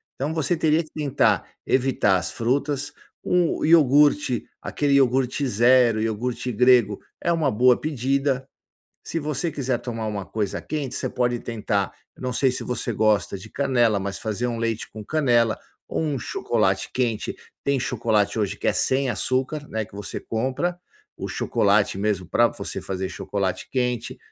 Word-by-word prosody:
Então 145 +4 -3
você 160 +2 +1
teria 160 0 +2
que 155 - -19
tentar 145 -3 +1 0.2
evitar 130 -6 +2
as 90 - -3
frutas, 140 +4 -1 0.3
um 180 -2 +1
iogurte, 145 -4 +4 0.2
aquele 145 -1 0
iogurte 135 +1 +2
0, 120 0 +4
iogurte 115 +3 -2
grego, 120 -3 +4 0.2
é 170 - 0
uma 160 -4 +1
boa 125 +2 +5
pedida. 135 -2 0 0.6
Se 165 - -3
você 150 +1 -2
quiser 135 -4 -1
tomar 115 -2 -4
uma 105 -2 -3
coisa 105 -1 -3
quente, 145 -4 -4
você - - -2
pode 120 -1 0
tentar, 105 -4 -2 0.2
não 130 -1 -3
sei 130 0 +2
se - - -4
você 125 -1 -3
gosta 105 -2 +2
de 105 +3 -11
canela, 120 -6 +2
mas 100 0 -4
fazer 110 +2 -2
um 120 -1 -2
leite 115 -1 -2
com 110 -1 -9
canela 120 -5 +2 0.3
ou - - -1
um 150 -4 -1
chocolate - - 0
quente 120 -4 -1 0.3
tem 140 -1 +1
chocolate 110 -5 0
hoje 105 -3 -1
que - - -4
é - - +3
sem 135 +1 +1
açúcar, 135 +4 -1
né, 110 0 -2
que 105 - -19
você 100 -1 -6
compra 130 +10 -2 0.4
o - - -5
chocolate 100 -1 +1
mesmo 100 -2 -1
pra 120 - +4
você - - -6
fazer 95 0 -3
chocolate 95 -1 -3
quente, 125 -3 -2
125 Hz, 160 wpm, -24 LUFS, 110-140 Hz, 0.6 s, boa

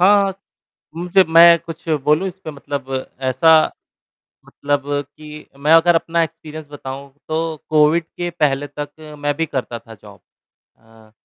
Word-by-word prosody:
हाँ। 195 0 +4 0.6
मुझे 180 +3 +3
मैं 170 +1 +8
कुछ 165 0 -11 0.2
बोलूँ 150 +6 +2
इस 185 0 -11
पे 155 - -5
मतलब 140 -2 -5 0.2
ऐसा 160 +6 +3 1.0
मतलब 145 -1 -2 0.3
कि 150 0 -11
मैं 150 +3 +1
अगर 165 +1 +5
अपना 165 0 0
एक्सपीरियंस 155 -1 -8
बताऊँ, 140 0 -8 0.2
तो 160 0 -2
कोविड 155 +2 +3
के 175 0 -2
पहले 145 -4 0
तक 145 0 -7 0.3
मैं 145 0 0
भी 165 - 0
करता 130 -5 -4
था 115 - -14
जॉब। 100 -2 -15 0.6
अ, 110 -1 -21
155 Hz, 145 wpm, -19 LUFS, 140-165 Hz, 1.0 s, मैं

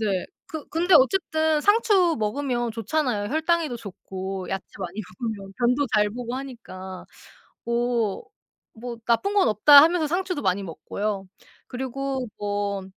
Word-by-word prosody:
네네. 195 -4 -1 0.2
그 315 -2 -7
근데 345 +3 +2
어쨌든 315 0 +2
상추 405 -4 +4
먹으면 240 +1 -1
좋잖아요, 225 -2 -1
혈당에도 320 -3 +1
좋고 190 -3 -6
야채 195 0 -3 0.2
많이 185 +3 -5 0.2
먹으면 205 -5 -4
변도 250 +3 +2
잘 210 -1 +3
보고 245 +1 -5
하니까. 210 -8 -8 0.6
'오. 235 -3 0 0.5
뭐 235 +1 -7
나쁜 390 - +1
건 400 -2 +4
없다.' 280 +7 +8
하면서 330 0 +3
상추도 360 -2 -2
많이 190 +1 0
먹고요. 195 +4 -4 0.4
그리고 265 +1 -3
뭐 205 -1 -2
240 Hz, 280 characters per minute, -24 LUFS, 205-305 Hz, 0.6 s, 없다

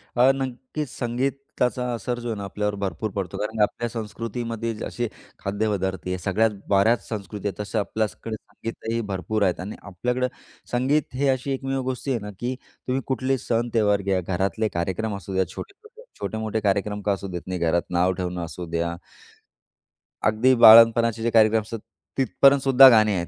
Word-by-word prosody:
अ, 125 +2 +6
नक्कीच 130 +2 -4
संगीताचा 125 0 -1
असर 120 +2 -3
जो 120 - -6
आहे 110 - -3
ना 100 - -5
आपल्यावर 105 +1 -2
भरपूर 95 +3 -2
पडतो 95 -4 -3
कारण 110 +1 -3
आपल्या 120 +3 -1
संस्कृतीमध्ये 115 +1 -4
असे 120 0 -3 0.3
खाद्यपदार्थ 100 -2 -2
आहे. 90 0 -1
सगळ्यात 100 +5 +1 0.2
बऱ्याच 100 +4 +3
संस्कृती 105 -1 -5
आहे 100 - -4
तशा 105 +2 -2
आपल्याकडे 110 +1 -3
संगीतही 115 +1 -5
भरपूर 105 +3 -1
आहेत 90 -2 +1
आणि 100 +4 -5
आपल्याकडे 125 +7 -2 0.4
संगीत 130 +4 +1
हे 140 +2 +1
अशी 130 +1 0
एकमेव 135 0 -2
गोष्टी 130 +1 -3
आहे 120 - 0
ना, 105 - -7
की 125 +2 -2 0.3
तुम्ही 130 +1 0
कुठलेही 130 +1 0
सण-त्योहार 115 -4 +1
घ्या, 95 -1 0
घरातले 95 +5 -1
कार्यक्रम 95 +5 -2
असू 100 0 -8
द्या 95 0 +1
छोटे-छोटे, 435 +3 -11 0.2
छोटे-मोठे 110 0 -2
कार्यक्रम 105 0 0
का 100 - 0
असू 100 0 -5
देत 90 -2 -5
नाही, 95 -1 -3
घरात 85 +1 0
नाव 90 +1 +3
ठेवणं 90 -1 -3
असू 85 +2 -7
द्या. 85 0 -1 1.3
अगदी 110 +5 +4
बाळंतपणाचे 115 0 +8
जे 115 - +2
कार्यक्रम 110 0 +5
असतात, 110 +2 -7 0.4
तिथपर्यंतसुद्धा 135 0 +6
गाणी 110 -3 +5
आहेत. 85 -1 -2
110 Hz, 160 wpm, -24 LUFS, 100-125 Hz, 1.3 s, बाळंतपणाचे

